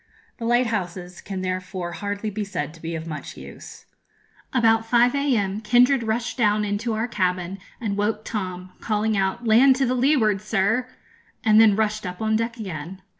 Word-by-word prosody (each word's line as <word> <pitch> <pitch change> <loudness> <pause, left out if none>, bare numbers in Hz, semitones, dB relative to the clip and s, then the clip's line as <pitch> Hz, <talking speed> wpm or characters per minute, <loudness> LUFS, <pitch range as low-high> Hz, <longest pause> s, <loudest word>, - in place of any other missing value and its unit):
The 230 - -4
lighthouses 195 -7 -1
can 190 -2 -5
therefore 185 -1 -4
hardly 205 +4 -4
be 210 +1 -3
said 165 -7 -4
to 165 - -16
be 165 0 -4
of 160 0 -5
much 155 -2 -7
use. - - -11 0.7
About 225 -3 +3
5 240 +2 +3
a.m. 220 -8 0
Kindred 245 +4 +4
rushed 230 +3 -2
down 210 -2 +2
into 210 +3 -2
our 220 +2 -1
cabin, 185 -3 -1 0.2
and 210 -4 -2
woke 210 +1 -1
Tom, 185 -4 -5
calling 215 0 0
out, 195 +4 -1
'Land 250 +4 +6
to 260 -1 +1
leeward, 245 -6 +2
sir!' 215 +4 0 0.6
and 220 -1 +6
then 215 -3 +6
rushed 215 -2 -1
up 180 0 -7
on 220 0 +1
deck 230 +2 -1
again. 185 -2 -7
210 Hz, 170 wpm, -23 LUFS, 185-230 Hz, 0.7 s, Land